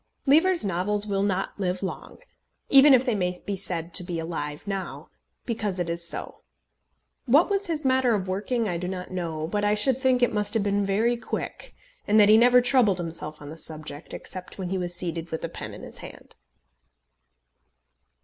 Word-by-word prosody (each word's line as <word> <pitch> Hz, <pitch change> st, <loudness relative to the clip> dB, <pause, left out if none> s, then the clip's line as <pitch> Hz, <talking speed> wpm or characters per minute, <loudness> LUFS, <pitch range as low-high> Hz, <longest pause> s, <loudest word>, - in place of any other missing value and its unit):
Lever's 330 Hz, -, +4 dB
novels 200 Hz, +3 st, +2 dB
will 200 Hz, -2 st, -1 dB
not 195 Hz, 0 st, -2 dB
live 185 Hz, 0 st, -2 dB
long, 190 Hz, -, -6 dB, 0.5 s
even 275 Hz, +1 st, +8 dB
if 260 Hz, -1 st, +5 dB
they 245 Hz, -, +1 dB
may 180 Hz, -3 st, -1 dB
be 200 Hz, -, -2 dB
said 170 Hz, -3 st, -4 dB
to 180 Hz, -, +7 dB
be 175 Hz, -1 st, -4 dB
alive 160 Hz, -2 st, -5 dB
now, 195 Hz, -2 st, -5 dB, 0.3 s
because 215 Hz, -5 st, -2 dB
it 170 Hz, -1 st, -1 dB
is 170 Hz, 0 st, -2 dB
so. -, -, -4 dB, 0.9 s
What 295 Hz, -, +4 dB
was 400 Hz, -1 st, 0 dB
his 310 Hz, -3 st, -3 dB
manner 260 Hz, -3 st, +3 dB
of 190 Hz, -2 st, -3 dB
working 215 Hz, +5 st, -1 dB
I 175 Hz, -3 st, -2 dB
do 180 Hz, +1 st, -4 dB
not 180 Hz, 0 st, -6 dB
know, 165 Hz, -4 st, -3 dB
but 205 Hz, +4 st, -2 dB
I 205 Hz, 0 st, +2 dB
should 255 Hz, +5 st, +2 dB
think 255 Hz, -2 st, +2 dB
it 245 Hz, -, +2 dB
must 210 Hz, +1 st, 0 dB
have 220 Hz, -, +2 dB
been 200 Hz, 0 st, +1 dB
very 225 Hz, +5 st, +1 dB
quick, -, -, -6 dB, 0.3 s
and 215 Hz, +1 st, +4 dB
that 205 Hz, -1 st, +6 dB
he 215 Hz, -, +8 dB
never 250 Hz, +1 st, +6 dB
troubled 245 Hz, -6 st, +3 dB
himself 160 Hz, -3 st, -6 dB
on 145 Hz, -, -9 dB
the 160 Hz, +2 st, -10 dB
subject, 155 Hz, -1 st, -8 dB
except 185 Hz, -1 st, -9 dB
when 185 Hz, -2 st, -4 dB
he 190 Hz, -, -1 dB
was 175 Hz, -1 st, -2 dB
seated 170 Hz, -2 st, -3 dB
with 160 Hz, -, -5 dB
a -, -, -5 dB
pen -, -, -7 dB
in -, -, -11 dB
his -, -, -10 dB
hand. -, -, -12 dB
200 Hz, 195 wpm, -25 LUFS, 175-240 Hz, 0.9 s, even